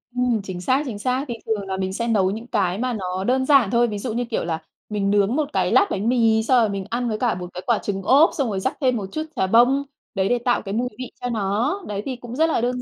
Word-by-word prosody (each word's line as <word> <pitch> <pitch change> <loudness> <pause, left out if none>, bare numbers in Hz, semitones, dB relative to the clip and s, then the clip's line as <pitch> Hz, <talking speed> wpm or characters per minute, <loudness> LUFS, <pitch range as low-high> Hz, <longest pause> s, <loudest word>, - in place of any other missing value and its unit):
Ừm, 245 -3 +1
chính 180 -2 -6
xác, 260 +9 +1
chính 220 -6 -5
xác. 255 +5 -1
Thì 240 - -3
thường 205 -3 -2
là 190 - -3
mình 190 0 -2
sẽ 235 +3 -2
nấu 195 -5 +2
những 225 +3 -6
cái 195 -7 0
mà 250 +2 -1
nó 185 -2 -3
đơn 260 +4 +1
giản 265 -8 +4
thôi. 240 0 +3
Ví 210 -2 -4
dụ 230 +1 -3
như, 245 +2 -1
kiểu 230 - -2
là, 165 -1 -2 0.3
mình 205 -2 -1
nướng 205 +3 +2
một 300 -1 0
cái - - +1
lát 400 - +5
bánh 205 +4 0
mì 225 -3 +3
xong 255 +2 +4
rồi 220 - +2
mình 195 -1 -4
ăn 240 +1 -1
với 215 -1 -2
cả 240 -4 +1
một 180 0 -6
cái 180 - -6
quả 235 - +3
trứng 195 -1 -4
ốp, 280 - +6
xong 275 -6 -1
rồi 195 - -2
rắc - - -2
thêm 255 -2 +2
một 200 - -4
chút 310 - -2
chà 190 - +1
bông, 245 +7 +4 0.3
đấy 190 -1 +1
để 245 - +3
tạo 240 0 +1
cái 195 -1 -6
mùi 245 +3 0
vị 255 - -6
cho 245 - -2
nó. 230 - -1
Đấy 205 -1 -3
thì 265 - -3
cũng 240 0 -9
rất 320 +4 +3
là 235 - +1
đơn 250 +1 -1
230 Hz, 295 wpm, -22 LUFS, 200-250 Hz, 0.3 s, ốp